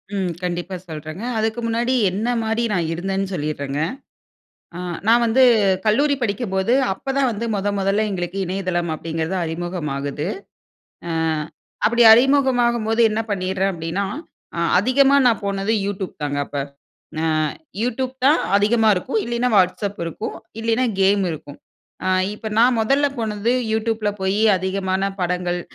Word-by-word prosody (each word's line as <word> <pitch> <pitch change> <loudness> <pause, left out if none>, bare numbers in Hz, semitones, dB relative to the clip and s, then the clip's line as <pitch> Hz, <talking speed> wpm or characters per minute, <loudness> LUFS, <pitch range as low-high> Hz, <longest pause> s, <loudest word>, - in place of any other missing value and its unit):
ம். 190 -3 -1
கண்டிப்பா 175 +1 -3
சொல்றாங்க. 155 +5 -7
அதுக்கு 220 +1 -1
முன்னாடி 235 +2 0 0.2
என்ன 210 +6 -2
மாரி 225 +1 0
நான் 170 -3 0
இருந்தேன்னு 195 +3 -2
சொல்லீர்றங்க. 145 -3 -3 1.0
ஆ - - -6 0.3
நான் 235 +2 +5
வந்து 245 +4 +3 0.4
கல்லூரி 285 +7 +3
படிக்கும்போது, 200 -1 -1 0.2
அப்போ 230 +8 -6
தான் 270 -2 +3
வந்து 225 +2 -4
மொத 200 +1 -1
மொதல 195 +2 +1
எங்களுக்கு 180 0 -3
இணையதளம் 180 -2 -2
அப்டிங்கறது 165 +3 -3
அறிமுகம் 170 -1 -4
ஆகுது. 145 +3 -3 0.8
அ - - -3 0.8
அப்டி 235 +2 +3
அறிமுகமாகும்போது 240 -3 +3
என்ன 215 +1 -1
பண்ணீர்றேன் 190 0 0
அப்டினா, 170 +4 -3 0.5
அ - - -4 0.2
அதிகமா 270 +6 +4
நான் 225 -3 +2
போனது 200 +2 -1
youtube 195 -2 -4
தாங்க 145 -1 -2
அப்ப. - - -17 0.7
அ - - 0 0.6
youtube 250 +2 -1
தான் 295 +3 +5 0.2
அதிகமா 220 +2 +3
இருக்கும், 265 - -1
இல்லைனா 240 +1 0
WhatsApp 195 +2 0
இருக்கும், 165 +6 -5 0.2
இல்லைனா 230 +2 +1 0.2
game 195 +1 +4
இருக்கும். 150 -2 -8 0.5
அ - - 0 0.3
இப்ப 220 +1 -6
நான் 240 +1 +4
முதல்ல 275 +6 +2
போனது 220 0 -1 0.2
youtube 220 0 -1
ல - - -1
போயி 190 +3 0
அதிகமான 190 +1 -1
படங்கள், 180 0 -1
200 Hz, 135 wpm, -21 LUFS, 180-230 Hz, 1.0 s, நான்